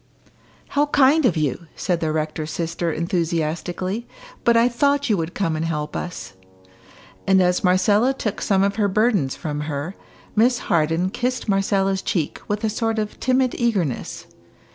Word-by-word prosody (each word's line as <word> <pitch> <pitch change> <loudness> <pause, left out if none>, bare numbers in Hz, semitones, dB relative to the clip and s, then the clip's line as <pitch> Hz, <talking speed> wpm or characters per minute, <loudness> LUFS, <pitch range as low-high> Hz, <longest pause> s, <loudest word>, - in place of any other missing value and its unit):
"How 290 +1 +2
kind 290 0 +4
of 175 - 0
you!" 155 +2 -1
said 175 -2 -1
the 160 -2 -1
rector's 155 0 -2
sister, 170 +1 -2
enthusiastically; 170 +5 -2 0.4
"but 235 -1 +4
I 230 +1 +5
thought 280 +2 +1
you 205 - +3
would 165 +1 -4
come 165 -6 0
and 155 - -2
help 150 -2 -3
us." 180 - -5 0.9
And 190 0 +5
as 180 -1 +2
Marcella 205 +7 +3
took 230 -6 -3
some 195 -1 +2
of 200 0 0
her 210 -2 +2
burdens 200 - +1
from 150 -2 -4
her, 145 +5 -3 0.4
Miss 240 +3 +4
Harden 170 -2 +1
kissed 250 +3 -2
Marcella's 195 -1 +1
cheek 160 -6 -2
with 210 +1 -2
a - - +2
sort 225 +1 -1
of 210 -1 -3
timid 255 -1 +2
eagerness. 200 - -1
190 Hz, 160 wpm, -22 LUFS, 165-230 Hz, 0.9 s, I